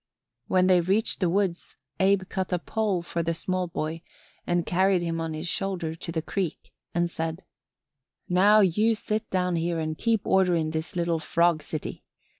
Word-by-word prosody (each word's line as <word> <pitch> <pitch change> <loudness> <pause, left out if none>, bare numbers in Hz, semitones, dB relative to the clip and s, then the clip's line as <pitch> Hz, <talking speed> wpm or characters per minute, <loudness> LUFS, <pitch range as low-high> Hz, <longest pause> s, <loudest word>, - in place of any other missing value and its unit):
When 185 0 +3
they 185 -1 +5
reached 195 +6 +1
the 180 -3 +2
woods 185 -1 -1 0.2
Abe 195 0 +3
cut 190 -1 -3
a 180 - +2
pole 200 -1 -1
for 170 0 -2
the 165 0 -1
small 185 +2 -2
boy 165 -1 -4 0.5
and 175 -1 +1
carried 185 0 +2
him 165 -1 -2
on 160 -1 -3
his 155 +3 -4
shoulder 185 -4 -2
to 165 +1 -7
the 160 -1 -2
creek 185 -4 -4 0.2
and 175 0 +1
said: 165 +1 -4 0.8
"Now 200 +4 +5
you 210 +5 +3
sit 215 +1 -3
down 180 -2 0
here 170 +1 -1
and 155 0 -2
keep 225 +3 0
order 185 -2 +3
in 160 -1 0
this 160 +2 -4
little 170 -1 0
frog 170 0 +2
city. 155 0 -6
175 Hz, 180 wpm, -26 LUFS, 165-190 Hz, 0.8 s, they